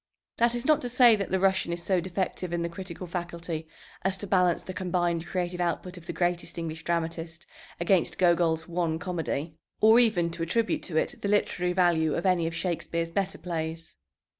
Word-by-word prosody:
That 235 0 +3
is 240 - -3
not 305 0 +4
to 245 - -3
say 245 -2 +6
that 200 -2 -3
the 190 - +1
Russian 190 -2 +2
is 170 0 -3
so 185 -1 +2
defective 185 0 -3
in 170 -1 -1
the 170 - -2
critical 180 0 -7
faculty 170 -2 -5 0.3
as 190 0 0
to 205 - -5
balance 180 -3 +2
the 185 - -6
combined 175 -3 -1
creative 180 -1 -2
output 180 +1 -2
of 175 -1 -12
the - - -2
greatest 175 -1 -1
English 160 -1 -5
dramatist 165 0 -3 0.3
against 170 -2 +2
Gogol's 170 -2 +2
one 170 -2 -1
comedy, 165 -3 -3 0.3
or 220 +2 +7
even 190 -8 +3
to 165 - -6
attribute 225 +7 0
to 165 -4 -3
it - - -1
the 200 - -1
literary 180 -3 +1
value 170 -4 +3
of 170 - -2
any 180 -3 +3
of 165 - -4
Shakespeare's 170 0 -2
better 195 +2 -1
plays. 165 -1 -5
175 Hz, 190 wpm, -28 LUFS, 165-190 Hz, 0.3 s, or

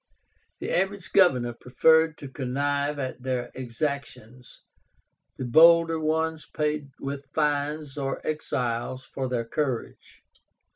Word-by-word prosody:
The - - -4
average 190 -1 -1
governor 125 -11 +4
preferred 160 +6 +3
to 140 - -8
connive 140 +2 -1
at 130 -2 -4
their 125 -1 -2
exactions; 130 -2 -5 0.8
the 130 - -4
bolder 165 +5 +6
ones 160 0 -1
paid 150 -2 -2
with 140 0 -5
fines 150 -1 -1
or 135 -1 -2
exiles 130 -4 -2
for 135 -1 -4
their 120 -2 -1
courage. 130 0 -4
140 Hz, 110 wpm, -26 LUFS, 130-155 Hz, 0.8 s, bolder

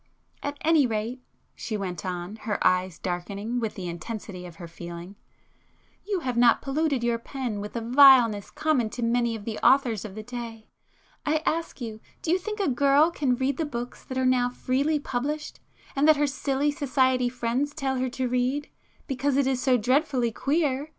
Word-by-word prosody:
"At 285 0 -4
any 310 -4 +4
rate,"—she 225 0 -5
went 185 -4 -4
on, 180 +3 -4
her 215 -1 -2
eyes 185 -2 +2
darkening 200 +6 -3
with 225 -3 -3
the 185 -3 -5
intensity 180 +1 -6
of 170 - -12
her 170 0 -9
feeling—"you 175 - -9
have 250 -5 -2
not 240 -1 +5
polluted 280 -2 0
your 235 -1 +1
pen 245 -4 -4
with 210 - -7
the 235 - -3
vileness 245 -4 +6
common 280 -8 0
to 240 +2 -5
many 235 0 +1
of 210 -2 -8
the 220 -2 -4
authors 245 -4 +3
of 200 -2 -8
the 215 - -6
day. 230 -2 -7 0.6
I 310 +1 0
ask 325 -4 -2
you, 220 -2 -5 0.2
do 325 - 0
you 365 - +3
think 425 +3 -5
a 395 - +1
girl 280 +4 +4
can 275 -6 +1
read 260 +2 -1
the 325 - 0
books 245 -5 -5
that 260 - -5
are 260 - +1
now 250 -1 +3
freely 270 +5 0
published, 295 +2 -3 0.4
and 280 +2 +3
that 310 -2 +6
her 295 - +3
silly 280 0 0
society 260 -3 +1
friends 245 +3 -1
tell 275 -3 -2
her 255 0 0
to 255 +1 -2
read,—'because 270 +2 -2
it 280 - +3
is 260 -1 0
so 255 -2 +4
dreadfully 255 0 +1
queer! 285 +2 0
250 Hz, 180 wpm, -26 LUFS, 220-280 Hz, 0.6 s, vileness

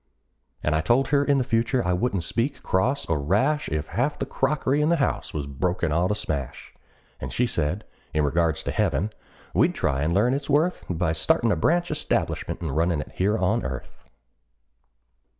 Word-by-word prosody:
And 75 - +1
I 80 - +2
told 120 +12 +2
her 145 -1 +3
in 140 -1 +3
the 130 - +2
future 120 -1 +1
I 90 - +2
wouldn't 95 -1 0
speak 115 - -2
cross 125 +10 +1
or 80 -3 0
rash 120 - +1
If 75 0 -3
half 135 +6 0
the - - -2
crockery 140 +1 0
in 150 - +2
the 170 - +4
house 145 -5 -1
was 75 -2 -3
broken 85 +4 -1
all 85 +4 +2
to 105 - 0
smash; 70 -10 -4 0.5
And - - -5
she 125 - +1
said, 90 -1 -1 0.3
in 75 -1 +1
regards 80 +1 +1
to - - -2
heaven, 90 +10 0 0.4
we'd - - +3
try 70 0 0
and 75 +3 +1
learn 105 +8 +3
its 140 +2 -3
worth 155 +6 +2
By 80 -2 0
startin' 80 +8 +2
a - - +3
branch 170 - +1
establishment 150 - -1
and - - -3
runnin' 85 0 +1
it - - -9
here 105 +4 +1
on - - +1
earth. 65 -1 -7
95 Hz, 190 wpm, -25 LUFS, -, 0.5 s, the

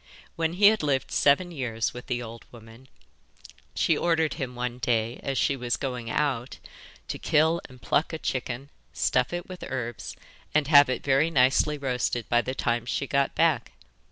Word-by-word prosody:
When 165 0 -1
he 200 +3 +7
had 220 0 0
lived 140 -3 0
seven 160 +6 +3
years 120 -7 -2
with 125 - -9
the 120 0 -2
old 115 0 -9
woman 115 +2 -15 0.9
she - - +2
ordered 165 -2 +1
him 125 -3 -5
one 125 0 -4
day, 115 -1 0
as 135 -1 -3
she 140 - +2
was 120 -2 -2
going 125 -4 -4
out, 130 -2 -1 0.5
to - - -5
kill 160 +2 +2
and 130 -1 -15
pluck 150 - +1
a 160 - -3
chicken, 130 -1 -4 0.2
stuff 125 -1 +1
it 175 0 -4
with 185 -1 -9
herbs, 120 -3 -5 0.4
and 155 -1 +4
have 145 -3 +7
it 130 - -2
very 140 +3 +3
nicely 140 +1 +3
roasted 125 -4 -2
by 120 0 +4
the 130 +3 -4
time 120 -2 -1
she 135 - -1
got 140 0 0
back. - - +1
130 Hz, 180 wpm, -26 LUFS, 120-150 Hz, 0.9 s, he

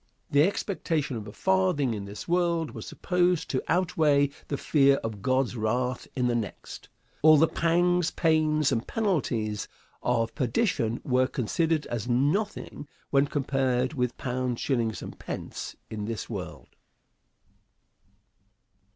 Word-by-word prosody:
The 145 - +5
expectation 165 - 0
of 110 -1 -6
a - - -7
farthing 185 - +1
in 100 -2 -5
this 100 +1 -8
world 170 -2 +1
was - - -8
supposed 180 -2 0
to 130 - 0
outweigh 155 -5 +2 0.2
the 140 - -2
fear 140 -2 +4
of 110 -3 -5
God's 130 +1 +1
wrath 125 +3 -1
in 125 - +1
the 120 - +2
next. 115 -4 -5 0.3
All 155 0 +8
the 160 +3 +5
pangs, 175 +1 +2
pains, 155 -3 +2
and 120 -2 -1
penalties 125 - -1 0.3
of 115 -2 0
perdition 120 - 0
were 130 0 +2
considered 155 +5 0
as 120 0 -4
nothing 145 - 0 0.2
when 140 0 +4
compared 135 -2 0
with 125 -4 -1
pounds, 125 -1 -2
shillings 115 -5 -1
and - - -9
pence - - -6 0.2
in 105 -2 -4
this 110 -2 -4
world. - - -7
135 Hz, 135 wpm, -27 LUFS, 120-165 Hz, 0.3 s, All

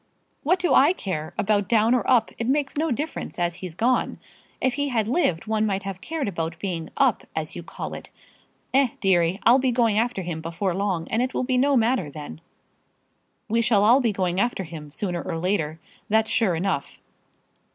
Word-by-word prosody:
"What 355 +6 +2
do 365 -1 +1
I 295 +6 +6
care 170 - -5
about 205 -2 +1
down 225 +1 +4
or 250 - +3
up? 240 -4 +4
It 230 - -2
makes 275 +1 0
no 315 +2 0
difference, 295 +5 -4
as 175 -1 0
he's 180 -4 -7
gone. 245 +6 +1 0.4
If 260 - +1
he 285 +1 -1
had 225 -4 0
lived 225 - +1
one 220 -1 0
might 200 -2 -1
have 190 -1 -6
cared 320 -5 -3
about 165 -3 -3
being 170 -3 -4
up, - - +2
as - - -3
you - - -5
call - - -7
it. - - -8 0.6
Eh, 270 0 +5
deary; 185 -2 +2
I'll 245 +3 +6
be 260 -1 +1
going 230 -3 +2
after 235 -4 -1
him 165 -2 -4
before 170 +3 -2
long, 185 -3 -1
and 225 - +1
it 255 +1 -2
will - - 0
be 255 0 +1
no 280 +1 +3
matter 230 - +1
then." 145 - -9 1.1
"We 230 +2 +2
shall 220 -3 +3
all 240 +6 +6
be 235 -3 +2
going 185 -2 -1
after 240 -3 0
him, 155 -3 -9
sooner 175 +2 -3
or 170 -3 -4
later; 165 -3 -1 0.3
that's 220 +1 +2
sure 195 -7 +2
enough." 165 -4 -2
210 Hz, 200 wpm, -24 LUFS, 175-250 Hz, 1.1 s, I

